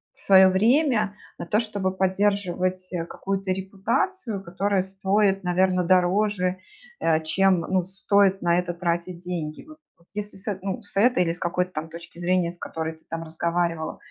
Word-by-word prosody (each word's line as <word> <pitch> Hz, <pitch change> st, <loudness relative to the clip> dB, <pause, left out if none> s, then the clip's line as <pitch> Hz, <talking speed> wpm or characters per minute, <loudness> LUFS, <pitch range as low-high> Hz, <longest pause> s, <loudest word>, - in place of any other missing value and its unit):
свое 190 Hz, -1 st, +6 dB
время 220 Hz, +1 st, +2 dB, 0.2 s
на -, -, -4 dB
то, 210 Hz, -, +2 dB
чтобы 205 Hz, -4 st, -2 dB
поддерживать, 185 Hz, -1 st, 0 dB
э, 170 Hz, -, -1 dB
какую-то 195 Hz, +1 st, -3 dB
репутацию, 200 Hz, -, -2 dB
которая 195 Hz, +2 st, 0 dB
стоит, 195 Hz, 0 st, +1 dB
наверно, 180 Hz, +1 st, +2 dB
дороже, 185 Hz, +1 st, +2 dB, 0.4 s
э, 160 Hz, -1 st, +2 dB
чем, 185 Hz, +2 st, +3 dB
ну, 185 Hz, 0 st, 0 dB
стоит 195 Hz, 0 st, +2 dB
на 170 Hz, 0 st, +3 dB
это 180 Hz, -1 st, -3 dB
тратить 175 Hz, 0 st, -2 dB
деньги. 170 Hz, -4 st, -5 dB
Вот 310 Hz, -, -13 dB, 0.2 s
вот 170 Hz, -, -27 dB
если 210 Hz, -1 st, -3 dB
с 190 Hz, -, -3 dB
этой, 200 Hz, -3 st, -2 dB
ну, 195 Hz, -2 st, -3 dB
с -, -, -8 dB
этой 210 Hz, -3 st, +4 dB
или 165 Hz, -, 0 dB
с 175 Hz, -, -11 dB
какой-то 180 Hz, +1 st, -1 dB
там 160 Hz, -1 st, -5 dB
точки 170 Hz, +1 st, -11 dB
зрения, 175 Hz, -1 st, +1 dB
с 175 Hz, -, -11 dB
которой 160 Hz, 0 st, -4 dB
ты 160 Hz, -, -21 dB
там 165 Hz, 0 st, -4 dB
разговаривала, 165 Hz, 0 st, -2 dB
185 Hz, 170 wpm, -24 LUFS, 175-200 Hz, 0.4 s, свое